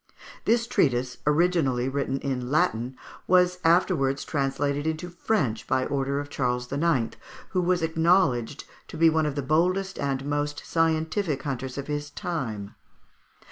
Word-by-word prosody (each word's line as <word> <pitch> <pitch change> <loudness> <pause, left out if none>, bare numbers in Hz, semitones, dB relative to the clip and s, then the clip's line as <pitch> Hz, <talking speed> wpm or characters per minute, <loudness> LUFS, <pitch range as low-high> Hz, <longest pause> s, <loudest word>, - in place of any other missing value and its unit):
This 235 +1 +3
treatise, 130 - +1
originally 150 -6 +2
written 135 0 -1
in 125 -3 -3
Latin, 130 -4 +1 0.3
was 180 0 +4
afterwards 165 -5 +2
translated 140 +1 -1
into 160 +3 -3
French 160 - -1
by 130 0 +1
order 140 0 -1
of 145 - -5
Charles 125 -3 -2
IX., 140 -5 +1 0.3
who 185 - 0
was 180 -1 +1
acknowledged 160 -7 +2 0.2
to - - -8
be 165 0 +5
one 160 -1 +2
of 145 - -3
the 145 - -2
boldest 180 +7 +1
and 135 -1 -1
most 145 0 -2
scientific 160 -1 0
hunters 130 -2 -4
of 140 - -4
his 145 0 -3
time. 120 - -4
145 Hz, 140 wpm, -26 LUFS, 135-165 Hz, 0.3 s, be